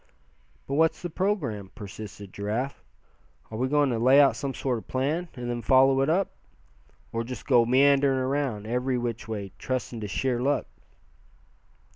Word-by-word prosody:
"But 135 - -5
what's 160 +4 +2
the 175 - -4
programme?" 155 - -1
persisted 100 -1 -9
Giraffe. 110 +7 -3 0.7
"Are 110 - -5
we 130 - +1
going 145 -1 +2
to 115 - -1
lay 130 +4 +6
out 140 -1 +5
some 140 -2 -4
sort 125 -4 -1
of - - -16
plan, 150 +7 -1
and 125 -2 -5
then 120 0 -2
follow 135 +1 +5
it 135 - +1
up; 190 +4 +1 0.8
or 115 0 -2
just 125 +2 -7
go 120 -4 +4
meanderin' 135 +1 +4
around, 130 -5 -1
every 125 +3 0
which 120 -2 -4
way, 100 -3 -5
trusting 130 -2 -3
to 105 - -4
sheer 125 +4 -1
luck?" 140 +2 +1
130 Hz, 165 wpm, -27 LUFS, 115-140 Hz, 0.8 s, lay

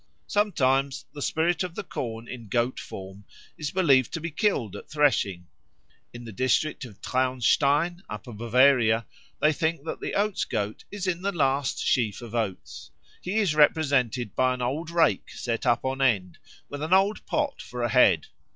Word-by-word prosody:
Sometimes 140 -9 +1
the 145 - -8
spirit 165 +4 0
of 180 -2 -3
the - - -4
corn 115 -1 -5
in 120 -3 -8
goat 120 +4 0
form 95 +1 -9 0.3
is 150 -2 -4
believed 140 -8 +3
to - - -2
be 165 +1 -5
killed 145 - 0
at - - -10
threshing. 130 - +1 0.7
In 120 0 -10
the 115 - -8
district 130 +6 0
of 105 -5 -13
Traunstein, 140 +6 +1
Upper 105 +3 -7
Bavaria, 115 0 +3 0.3
they 155 +1 +3
think 160 0 -1
that - - -4
the - - -4
Oats 205 -1 +1
goat 105 0 -3
is 205 -2 -5
in 180 -2 -1
the 200 +1 -1
last 140 -5 0
sheaf 115 -6 +1
of 115 -1 -9
oats. 110 -6 -4 0.3
He 185 +3 -4
is 200 -8 +2
represented 140 -7 +2
by 130 0 +2
an 125 - -7
old 150 +7 -2
rake 170 -1 +2
set 115 +1 -3
up 120 +1 +2
on 135 +1 -2
end, 100 -10 +1 0.3
with 145 0 -7
an 160 +4 0
old 195 +3 +3
pot 295 -2 -1
for 125 -1 -6
a 120 - +1
head. 100 - +4
135 Hz, 175 wpm, -26 LUFS, 120-160 Hz, 0.7 s, head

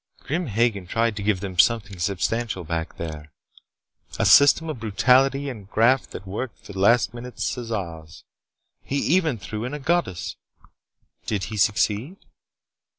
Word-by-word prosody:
Grim 165 +4 -2
Hagen 110 -4 0
tried 115 +3 0
to 105 - -5
give 100 -2 0
them 95 -4 -5
something 100 -3 +2
substantial 100 +3 -1
back 80 0 -4
there: 75 -2 -7 0.9
A - - +1
system 145 +3 +6
of 155 -6 -5
brutality 130 +6 +3
and 105 -7 -8
graft 120 +5 +3
that 95 - -9
worked 110 +6 -5
for 100 - -9
the 95 - -6
last 115 +2 +4
minute 120 +1 -9
Caesars. 90 -10 -4 0.6
He 140 - -4
even 160 -3 +2
threw 105 +3 -6
in 130 +4 -4
a - - -6
goddess. 135 - -1 0.9
Did 100 -3 -1
he 110 - -5
succeed?" 105 - +1
110 Hz, 150 wpm, -24 LUFS, 95-125 Hz, 0.9 s, system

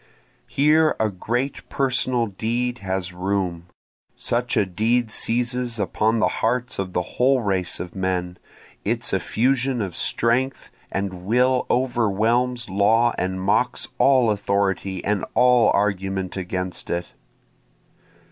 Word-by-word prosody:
Here 155 +2 +3
a 110 -1 +1
great 120 +8 -3
personal 125 -2 +1
deed 120 +4 -2
has 95 -2 -3
room, 90 -2 -2 0.5
(Such 120 +1 -1
a 105 - +3
deed 110 +5 0
seizes 120 0 0
upon 105 +4 +1
the 110 - +3
hearts 125 +1 0
of 95 -2 -3
the 90 - 0
whole 130 +5 +1
race 95 -3 -1
of 90 -1 -6
men, 90 -1 -2 0.4
Its 115 +3 -1
effusion 125 +7 +1
of 95 -5 -3
strength 125 +3 0 0.2
and 95 -2 -4
will 125 +3 +2
overwhelms 120 0 +1
law 110 +5 +3
and 95 +1 -2
mocks 100 +6 +1
all 130 -5 +4
authority 100 -2 -1
and 105 -1 0
all 125 -2 +5
argument 95 -2 -1
against 90 -1 -4
it.) 85 0 -3
110 Hz, 120 wpm, -23 LUFS, 95-125 Hz, 0.5 s, all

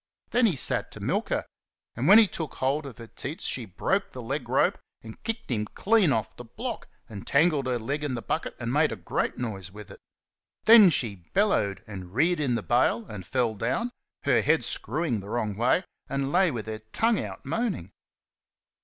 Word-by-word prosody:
Then 245 -1 +4
he 185 - 0
sat 130 - 0
to - - -10
milk - - -1
her, - - -1 0.5
and 125 +5 -1
when 200 +4 +9
he 225 - +8
took 160 -6 -5
hold 140 +3 0
of 130 - -10
her 115 - -9
teats 150 - -6
she 125 - -1
broke 95 - -1
the - - -8
leg - - -4
rope - - +2 0.2
and 110 -1 -11
kicked 225 - -4
him 105 -3 0
clean 205 -6 +3
off 110 -5 -1
the 120 - -9
block 230 - -6 0.2
and 105 -4 -9
tangled 150 -2 +3
her 125 -1 0
leg 140 +6 -3
in 140 -4 -1
the 115 - -5
bucket 160 - -2
and 120 0 -3
made 150 -1 +3
a - - -3
great 90 -5 -2
noise 100 -7 -4
with 105 0 -11
it. - - -12 0.6
Then 220 -3 +9
she 115 - 0 0.2
bellowed 190 - +2
and 95 -2 -9
reared 165 +5 +3
in 135 -5 +1
the - - -2
bail 120 -1 +2
and 100 -5 -9
fell 125 -3 +1
down, 125 - -1 0.3
her - - +3
head - - +2
screwed 125 -11 -1
the 100 - -10
wrong 110 -3 -2
way, 125 - +2 0.3
and 140 0 -1
lay 185 +2 +4
with 120 -7 -4
her 110 -1 -5
tongue 215 - 0
out - - -8
moaning. 220 - -2
130 Hz, 205 wpm, -27 LUFS, 110-170 Hz, 0.6 s, when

